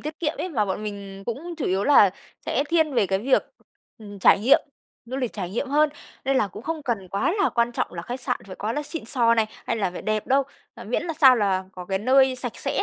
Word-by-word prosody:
tiết 305 +1 -6
kiệm 320 -1 0
ấy, 370 - -2
mà 240 -11 0
bọn 195 +1 -3
mình 200 -2 -7
cũng 310 +9 -5
chủ 305 - -2
yếu 190 +2 0
là 275 -9 +6 0.4
sẽ 280 - 0
thiên 320 -4 +2
về 210 -5 +3
cái 190 0 0
việc, 260 +5 +2 0.6
ừm, 205 -2 -10
trải - - +6
nghiệm 265 +6 +5 0.4
du 250 +3 -6
lịch 255 -4 -2
trải 185 -4 -5
nghiệm 235 +7 -3
hơn. 300 +2 +3 0.4
Nên 270 0 +1
là 210 -6 +2
cũng 210 - -10
không 320 -1 -4
cần 220 -8 -3
quá 200 - 0
là 395 - +4
quan 235 0 0
trọng - - -2
là 170 -1 -6
khách 245 +7 -6
sạn - - -2
phải 185 - -9
quá 215 +2 -2
là 295 - -2
xịn 300 0 -6
xò 230 -1 +2
này, 225 -1 +2 0.2
hay - - 0
là 200 -4 0
phải 180 - -8
đẹp 215 -1 -1
đâu, 275 +1 +3 0.3
à, - - -10
miễn - - -1
là 335 - -3
sao 260 -4 +8
là 195 -4 +1
có 180 -1 -8
cái 190 +1 -1
nơi 260 +4 +4
sạch 245 -2 -5
sẽ - - -1
235 Hz, 260 wpm, -24 LUFS, 200-280 Hz, 0.6 s, sao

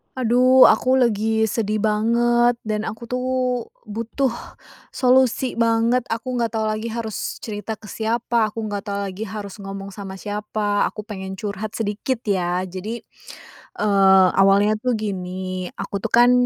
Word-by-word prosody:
Aduh 255 +1 +5
aku 255 +1 +5
lagi 220 -3 +2
sedih 215 -1 0
banget 235 +3 +3
dan 215 0 -2
aku 225 +2 -6
tuh 250 +2 -3 0.6
butuh 230 +5 -2 0.6
solusi 255 -1 +2
banget. 230 +2 +2
Aku 245 +2 -3
nggak 230 -1 -1
tahu 220 - 0
lagi 215 +2 -3
harus 225 -2 -4
cerita 215 0 -4
ke 215 - -30
siapa, 230 0 0
aku 220 +1 -6
nggak 205 -1 -4
tahu 200 0 -2
lagi 210 +4 -6
harus 205 0 -7
ngomong 195 0 -7
sama 195 -1 -8
siapa, 205 +1 -1
aku 215 - -7
pengen 190 -2 -6
curhat 205 +2 -5
sedikit 225 +3 -2
ya. 180 -3 0
Jadi, 190 +6 -6 0.8
eee, 195 -2 +5
awalnya 200 +2 +4
tuh 250 +1 0
gini, 185 -3 -4
aku 200 - -4
tuh - - -3
kan 240 +1 +6
215 Hz, 145 wpm, -22 LUFS, 200-235 Hz, 0.8 s, kan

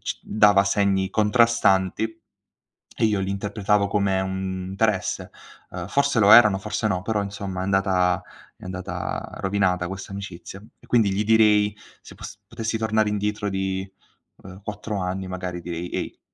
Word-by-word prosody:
c - - -4
dava 105 -2 +4
segni 100 -1 +1
contrastanti 110 -1 +2 0.8
e - - +3
io 105 -2 +2
li 95 0 -2
interpretavo 100 0 0
come 100 -2 +1
un 95 -1 -3
interesse, 100 -1 -1 0.4
uhm, 90 0 -6
forse 140 0 +1
lo 100 0 +5
erano, 105 -4 +8
forse 110 +2 -3
no, 90 -3 -1
però 105 0 -1
insomma 100 -2 -5
è - - -2
andata 95 -2 +1 0.3
è - - -15
andata 90 0 -5
rovinata 95 -2 0
questa 95 +1 -7
amicizia 100 -1 -8 0.2
e - - -19
quindi 110 -5 +3
gli 100 +2 0
direi 105 -2 +4 0.2
se - - -14
pos - - -9
potessi 115 -1 -3
tornare 110 -1 +1
indietro 105 0 -2
di, 95 0 -2 0.6
uhm, 95 +1 -11
4 105 0 -5
anni, 95 +1 -3
magari 90 -1 -5
direi: 85 0 -5
"Ehi, - - -5
100 Hz, 155 wpm, -23 LUFS, 95-105 Hz, 0.8 s, erano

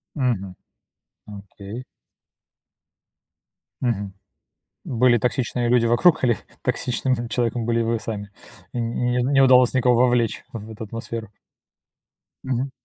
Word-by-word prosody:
Мгм. 115 - -1 0.7
Окей. 100 +3 -9 2.0
Мгм. 100 -6 -1 0.7
Были 120 0 +3
токсичные 120 0 -1
люди 120 -1 +4
вокруг, 145 +7 +4
или 120 -5 +2 0.2
токсичным, 130 +1 0
м, 120 0 -4
человеком 120 0 -1
были 115 0 +1
вы 115 0 0
сами? 105 -2 -5 0.4
Н 120 - -2
не 125 0 0
н 125 - +1
не 140 - 0
не 135 - +5
удалось 125 -1 +6
никого 125 -1 +3
вовлечь 120 -2 +2
в 110 -1 -7
эту 110 0 -7
атмосферу? 115 0 -6 1.2
Мгм. 130 +1 -1
120 Hz, 120 wpm, -23 LUFS, 110-125 Hz, 2.0 s, удалось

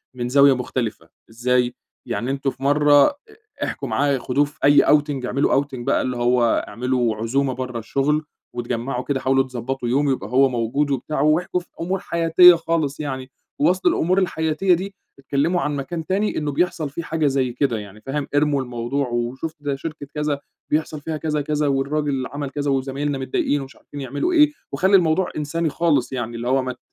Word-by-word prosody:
من 120 -1 -3
زاوية 140 +1 +6
مختلفة، 120 -9 -4 0.2
إزاي؟ 125 +2 0 0.3
يعني 120 +2 -2
أنتم 140 0 -1
في 135 - -10
مرّة 145 0 +5
ا 290 - -3 0.5
احكوا - - -4
معاه 140 -1 +1
خدوه 130 +4 +1
في 145 - -15
أي 145 +1 +6
outing 145 -3 +2
اعملوا 135 +2 +2
outing 145 - -19 0.2
بقى - - +2
اللي 125 -1 -2
هو 120 -1 +2
اعملوا 120 +1 0
عزومة 130 +5 0
برّه 125 -1 -4
الشغل، 145 +6 0 0.3
واتجمّعوا 120 +1 -3
كده 135 -1 -1
حاولوا 135 0 +2
تضبطوا 130 0 -4
يوم 140 +3 +2
يبقى 105 -6 -3
هو 130 +2 +4
موجود 125 +5 -1
وبتاع 140 +2 -2
واحكوا 165 +4 +2
في 175 - -16
أمور 185 +2 -1
حياتية 170 +1 +6
خالص 165 -4 -1
يعني، 130 -3 -5 0.3
ووسط 180 +5 +2
الأمور 185 +4 +2
الحياتية 170 +1 +1
دي 195 +3 -3 0.2
اتكلّموا 145 +6 0
عن 150 0 -1
مكان 160 +4 -4
تاني 200 +4 0
إنّه 150 -2 -1
بيحصل 170 0 0
فيه 160 +5 -6
حاجة 160 -2 0
زي 135 -3 0
كده 125 -2 0
يعني، 105 +1 -11
فاهم؟ 140 +3 -3
ارموا 145 -2 +2
الموضوع 125 +2 -2
وشُفت 125 +7 -3
ده 145 -1 -2
شركة 145 0 -7
كذا 150 -1 -1 0.3
بيحصل 155 0 -1
فيها 155 +1 -4
كذا، 150 -1 -1
كذا 150 0 0
والراجل 140 -1 0
عمَل 145 -1 -5
كذا 145 0 -2
وزمايلنا 135 +2 -1
متضايقين 135 +2 -1
ومش 135 0 -10
عارفين 145 - -10
يعملوا 140 - -2
إيه، 300 -2 +5 0.2
وخلّي 190 +8 +3
الموضوع 175 +1 +1
إنساني 160 +2 -1
خالص 145 -6 +1
يعني 120 -2 -3
اللي 120 +1 -4
هو 135 +1 +3
ما 130 0 -3
ت - - -25
140 Hz, 185 wpm, -22 LUFS, 130-155 Hz, 0.5 s, زاوية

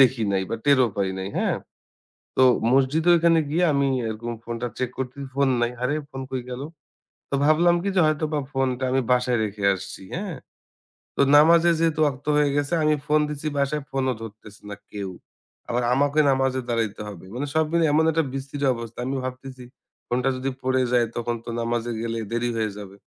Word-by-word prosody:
দেখি 130 -3 +5
নাই 95 -1 +1
বা - - -1
টেরও 135 -3 +5
পাই 100 -2 0
নাই। 95 0 -4
হ্যাঁ? - - +1 0.8
তো - - +4 0.3
মসজিদে 135 +5 +2
ঐখানে 165 0 +4
গিয়ে 170 +4 +2
আমি 140 -1 +2 0.2
এরকম 115 +2 -4
ফোনটা 120 +1 -4
চেক 130 -1 -1
করছি, 130 +1 -4 0.2
ফোন 140 0 +2
নাই। 120 0 +1
আরে 130 +4 +1 0.2
ফোন 135 - -6
কই 130 -1 -3
গেল? 125 +1 -5 0.7
তো - - -2
ভাবলাম 170 +3 +4
কি? 200 - -1
যে - - +5
হয়তোবা 155 0 0
ফোনটা 130 -1 0
আমি 135 +1 +2
বাসায় 125 -1 +2
রেখে 105 -1 -5
আসছি। 95 - -8
হ্যাঁ? 185 -2 -4 0.8
তো - - -1 0.2
নামাজে 170 +3 +6
যেহেতু 160 -2 +1
ওয়াক্ত 145 -1 -2
হয়ে 150 -1 +3
গেছে 145 +1 -1
আমি 155 0 +3
ফোন 150 0 +3
দিচ্ছি 150 +1 -4
বাসায় 140 +2 0
ফোনও 130 -2 0
ধরতেছে 105 -1 -11
না 100 - -6
কেউ। 100 -2 -5 0.6
আবার 120 0 0
আমাকে 145 +3 +2
নামাজে 135 -1 +1
দাঁড়াইতে 115 -3 -1
হবে। 95 -4 -10
মানে 135 +4 -3
সব 160 0 +3
মিলাই 170 -1 +3
এমন 155 +2 +4
একটা 160 0 +1
বিশ্রি 135 +1 -5 0.2
অবস্থা। 115 -1 -8
আমি 130 +2 -2
ভাবতেছি 130 0 -7 0.4
ফোনটা 125 +2 0
যদি 130 +1 -2
পড়ে 130 0 +2
যায়, 120 -1 +4
তখন 120 0 -1
তো - - -11
নামাজে 120 0 -1
গেলে 115 0 -2
দেরি 120 +1 0
হয়ে 110 -1 0
যাবে। 100 -1 -10
130 Hz, 185 wpm, -24 LUFS, 120-150 Hz, 0.8 s, নামাজে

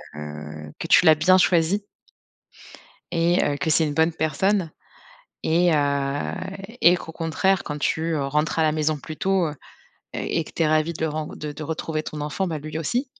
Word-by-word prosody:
heu, 75 0 -8
que 165 - -4
tu 180 - +6
l'as 160 -1 +8
bien 185 +5 +5
choisie 180 +2 +2 1.3
et 170 +2 +2
heu, 145 - 0
que 145 +2 -1
c'est 155 0 +3
une 145 - -3
bonne 160 +2 +3
personne 165 +4 0 0.7
et 175 +2 +3
heu 140 -1 0 0.5
et 175 +1 +6
qu'au 165 - -8
contraire 165 +4 0
quand 150 0 -4
tu, 155 - 0
heu, 145 -3 -1
rentres 150 +4 0
à - - +4
la 155 - +3
maison 155 0 0
plus 155 +2 -8
tôt, 190 -1 +1
heu - - -3
heu, - - -8 0.6
et 165 - -1
que - - -12
tu 165 - +1
es - - +3
ravie 155 +2 +2
de 160 0 -2
ren 155 0 -3
de 150 -1 -5
de 155 - -7
retrouver 160 0 -3
ton 150 -1 -6
enfant, 150 +6 -2
bah, 160 -3 -3
lui 155 +2 -5
aussi 240 - -1
155 Hz, 200 wpm, -23 LUFS, 150-170 Hz, 1.3 s, l'as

